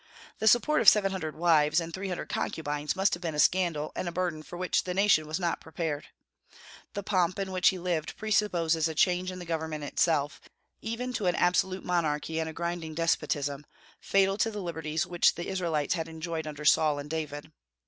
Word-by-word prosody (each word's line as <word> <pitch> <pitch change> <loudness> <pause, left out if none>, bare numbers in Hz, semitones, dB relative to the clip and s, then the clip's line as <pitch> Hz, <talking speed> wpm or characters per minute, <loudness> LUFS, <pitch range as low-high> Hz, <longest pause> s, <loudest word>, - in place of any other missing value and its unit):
The 220 - 0
support 300 +7 +4
of 215 - +10
seven 195 -2 +2
hundred 160 -5 -4
wives 160 -2 +3
and 165 0 -5
three 190 +3 -4
hundred 180 - -4
concubines 150 -8 -2
must 195 +1 +2
have 175 - -3
been 165 -3 -3
a - - -2
scandal 165 -4 +2
and - - -3
a - - -2
burden 175 -3 -2
for 175 +3 -10
which 185 0 0
the 180 -1 -4
nation 195 -6 +3
was 155 +4 -2
not 175 -2 -1
prepared. 160 -2 -4 0.9
The 200 - -4
pomp 185 -3 +1
in 195 -1 -3
which 185 -1 +4
he 190 - -3
lived 175 -3 -2
presupposes 175 -7 +1
a 160 - -5
change 180 +2 +2
in 185 - -6
the 180 - -7
government 160 -2 -3
itself, 145 0 0 0.4
even 245 +3 -4
to 215 -6 -1
an 175 - +2
absolute 185 +1 +1
monarchy 160 -2 -1
and 160 0 -2
a - - -5
grinding 170 -1 -4
despotism, 145 -3 0 0.4
fatal 195 +1 +2
to 225 - +2
the 210 -3 -5
liberties 160 -2 -2
which 175 -1 +3
the 175 - -5
Israelites 170 -6 -1
had 165 -3 -3
enjoyed 160 0 -5
under 150 0 -7
Saul 150 -1 +4
and 145 0 -6
David. 150 -2 -5
170 Hz, 200 wpm, -29 LUFS, 155-185 Hz, 0.9 s, of